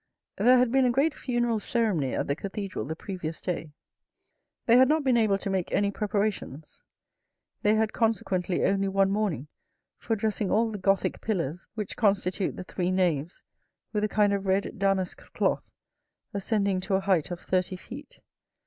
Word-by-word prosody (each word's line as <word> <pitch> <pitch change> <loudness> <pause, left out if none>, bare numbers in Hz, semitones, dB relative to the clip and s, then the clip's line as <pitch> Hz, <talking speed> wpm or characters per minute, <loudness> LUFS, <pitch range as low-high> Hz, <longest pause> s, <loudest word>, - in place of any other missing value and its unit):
There 255 +1 +6
had 250 -1 +3
been 265 0 +4
a - - +3
great 280 +5 +2
funeral 240 -3 0
ceremony 205 - 0
at - - -1
the 140 - -1
cathedral 195 +2 -5
the 160 - -4
previous 170 -3 -5
day. 165 -4 -4 0.9
They 235 - +5
had 260 +1 +7
not 310 0 +2
been 260 -3 +3
able 215 -4 +3
to 200 - -4
make 190 -2 -1
any 200 0 +2
preparations. 205 - -3 0.8
They 210 +1 +3
had 220 0 +1
consequently 190 -5 0
only 195 0 +2
one 195 0 +2
morning 200 -9 -1 0.5
for 225 - -1
dressing 210 -2 -1
all 225 +1 +2
the 210 - -5
Gothic 195 +1 +1
pillars 175 -5 -2
which 210 -3 -5
constitute 195 -3 +1
the - - -6
three 180 0 -2
naves 175 -4 0 0.5
with 210 -1 0
a 215 - +1
kind 205 -1 +3
of 200 -1 -2
red 190 +1 0
damask 195 -2 0
cloth - - 0 0.6
ascending 200 -1 0
to 190 +1 -1
a 190 - +1
height 190 -5 +1
of 175 -1 -5
thirty 185 +1 -1
feet. 255 +10 -11
200 Hz, 170 wpm, -27 LUFS, 185-220 Hz, 0.9 s, had